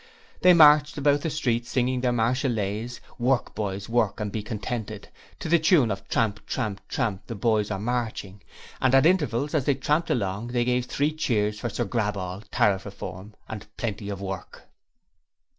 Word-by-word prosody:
They 180 0 +7
marched 150 -1 +6
about 145 0 +3
the 160 - -1
streets 120 -6 -1
singing 125 0 0
their 125 -1 +2
Marseillaise, 120 -2 -1 0.2
'Work, 125 +1 +1
Boys, 100 -2 -3
Work 115 -2 +1
and 105 -1 -3
be 110 - -3
contented', 110 0 -5 0.3
to - - -6
the 170 +1 +4
tune 155 - +4
of 95 0 -5
'Tramp, 105 -2 0
tramp, 105 -6 -3
tramp 100 -3 -2
the 115 - -5
Boys 105 0 +1
are 100 - -2
marching', 110 -3 -3 0.4
and 130 0 +4
at 135 - +5
intervals 150 -6 +2
as 145 -5 +1
they 140 - +3
tramped 150 +5 0
along, 100 0 -1
they 120 0 0
gave 125 0 0
three 145 +2 0
cheers 105 -8 0
for 120 - -3
Sir 120 - -2
Graball, 100 -4 -2
Tariff 95 -2 +2
Reform, 100 +1 -8
and 105 -2 -7
Plenty 105 -3 -3
of 100 -2 -4
Work. 95 -3 -6
115 Hz, 175 wpm, -26 LUFS, 105-130 Hz, 0.4 s, They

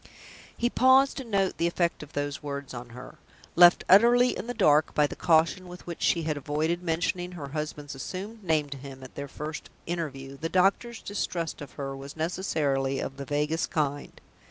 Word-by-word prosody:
He 240 - +1
paused 260 +2 +4
to 270 - -4
note 200 -5 0
the 170 - +3
effect 170 0 0
of 150 - -11
those 145 0 -3
words 140 -2 -5
on 120 0 -7
her. 125 +3 -11 0.4
Left 175 0 +7
utterly 240 +5 +6
in - - -6
the 245 - -2
dark 155 -7 +3
by 150 - +4
the - - -4
caution 165 +3 +2
with 180 0 -11
which 170 -2 -7
she 170 - +2
had 155 -2 -1
avoided 155 +4 -1
mentioning 175 +1 -1
her 145 -5 -7
husband's 150 -1 -5
assumed 200 +10 -7
name 155 -4 +1
to 140 - -5
him 135 -1 -10
at 130 - -11
their 140 0 -6
first 150 +3 -7 0.2
interview, 140 -5 -4
the 165 - -2
doctor's 195 +6 +1
distrust 170 -6 -3
of 145 - -9
her 135 -1 -5
was 140 +2 -9
necessarily 145 -6 0
of 135 - -5
the 140 - -6
vaguest 150 +3 -1
kind. 145 -2 -2
160 Hz, 190 wpm, -27 LUFS, 140-180 Hz, 0.4 s, Left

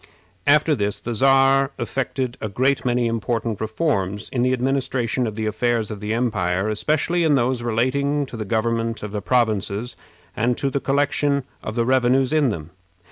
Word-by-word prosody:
After 150 +2 +5
this 105 -5 -1
the 120 - -4
Czar 135 +3 +4
effected 130 0 -2
a 110 - -3
great 130 +7 +1
many 125 -1 +1
important 115 -1 -2
reforms 110 - -1
in 125 - -1
the 130 +1 +2
administration 130 -1 0
of 110 - -5
the 110 0 -3
affairs 115 0 0
of 105 - -6
the 105 +1 -4
empire, 105 -5 0
especially 155 +10 0
in 155 -3 +4
those 125 -1 +1
relating 135 +5 0
to 130 - -10
the 110 - -3
government 115 +1 -1
of 105 - -5
the 105 -1 -3
provinces, 110 -1 0 0.4
and 120 +2 +1
to 140 - -1
the 140 - 0
collection 140 0 +1 0.2
of 110 - -6
the 120 -1 +1
revenues 130 +2 +2
in 150 -4 +3
them. 85 -6 -5
120 Hz, 175 wpm, -22 LUFS, 110-135 Hz, 0.4 s, After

